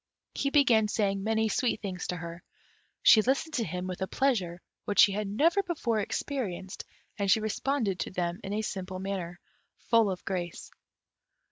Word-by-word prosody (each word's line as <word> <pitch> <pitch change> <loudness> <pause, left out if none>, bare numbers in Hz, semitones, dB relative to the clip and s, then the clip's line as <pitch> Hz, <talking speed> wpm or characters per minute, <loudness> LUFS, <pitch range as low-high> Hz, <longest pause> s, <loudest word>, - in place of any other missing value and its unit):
He 275 - 0
began 245 -7 +4
saying 200 -2 0
many 220 +1 +1
sweet 230 0 0
things 185 -3 -5
to 180 - -2
her. 170 0 -7 0.6
She 220 - +8
listened 275 +7 0
to 240 - 0
him 180 0 -4
with 185 0 -5
a 190 - 0
pleasure 190 -12 0 0.3
which 205 - +4
she 200 - +7
had 205 +1 -2
never 320 - +3
before 295 - -1
experienced, 200 -4 -4 0.3
and 200 -1 0
she 205 - +5
responded 220 -1 -1
to - - -2
them 175 -1 -2
in 195 - -5
a 215 +1 -1
simple 190 -3 -4
manner, 185 -2 -4 0.4
full 230 -3 +3
of 185 -2 -5
grace. 175 -3 -4
205 Hz, 170 wpm, -29 LUFS, 185-230 Hz, 0.6 s, She